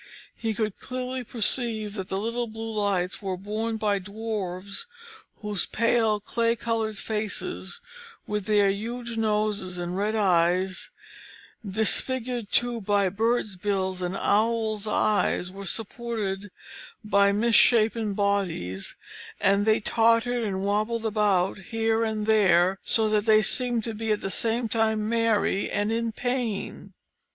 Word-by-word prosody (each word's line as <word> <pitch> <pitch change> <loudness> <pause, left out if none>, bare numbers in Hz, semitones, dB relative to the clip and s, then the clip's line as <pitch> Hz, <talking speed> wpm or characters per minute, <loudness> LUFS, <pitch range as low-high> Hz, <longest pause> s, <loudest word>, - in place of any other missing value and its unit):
He 225 -2 -3
could 215 -2 -2
clearly 255 0 -4
perceive 225 -2 +2
that 190 -3 -5
the 190 - -2
little 230 +3 -2
blue 225 0 -6
lights 200 -1 0
were 190 -2 -3
borne 215 +4 -3
by 210 -2 +1
Dwarfs 200 - -4 0.6
whose 210 -3 -1
pale 230 -2 +2
clay 230 +2 0
coloured 225 -2 -2
faces, 215 - -3 0.4
with 210 -2 -3
their 205 -2 +3
huge 235 +3 -5
noses 210 -4 0
and 175 0 -4
red 210 +3 0
eyes, 185 -2 +1 0.7
disfigured 230 +3 +1
too 240 -1 +2
by 200 -1 +2
birds' 220 +1 0
bills 190 -1 -2
and 180 +1 -2
owls' 220 0 +1
eyes, 205 -4 +1
were 195 +1 -8
supported 210 -2 -2 0.6
by 200 -1 +4
misshapen 220 0 +3
bodies, 190 - -1 0.4
and 200 +2 +2
they 220 0 +4
tottered 230 +2 +2
and 195 -3 -2
wabbled 215 +3 0
about 205 -4 +1
here 225 +3 0
and 215 -1 -2
there, 190 -3 +4
so 220 -1 +3
that 215 0 +1
they 215 0 +6
seemed 245 -1 +1
to 225 - -3
be 220 0 -3
at 210 - 0
the 195 - -3
same 230 +3 0
time 220 -1 0
merry 225 -3 +1
and 205 +1 -1
in 230 0 -1
pain. 245 -3 -3
215 Hz, 135 wpm, -26 LUFS, 200-230 Hz, 0.7 s, they